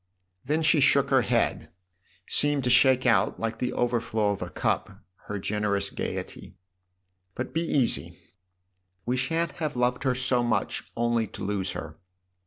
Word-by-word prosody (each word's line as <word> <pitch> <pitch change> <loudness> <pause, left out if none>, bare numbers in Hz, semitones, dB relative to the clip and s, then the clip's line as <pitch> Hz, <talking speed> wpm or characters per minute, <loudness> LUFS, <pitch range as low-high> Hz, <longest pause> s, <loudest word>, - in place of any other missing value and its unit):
Then 155 +4 0
she 155 0 +5
shook 140 0 +4
her 135 -1 +5
head 110 - 0 0.6
seemed 145 -2 0
to 125 - +1
shake 130 +1 +5
out, 105 -6 +2
like 115 0 -3
the 125 - -1
overflow 115 -3 0
of 100 - -5
a - - -4
cup, - - -2 0.3
her 105 - -3
generous 100 0 -1
gaiety. - - -6 0.4
" 90 0 -49
But - - -5
be 165 - 0
ea. 145 -7 +2 0.2
:y. - - -19 0.9
We 125 - 0
shan't 165 +6 -1
have 150 -3 -2
loved 125 0 0
her 130 -2 +1
so 125 -1 +2
much 120 -2 -1
only 120 -1 +1
to 100 - -9
lose 95 -1 -2
her." 80 -1 -8
120 Hz, 165 wpm, -26 LUFS, 105-130 Hz, 0.9 s, she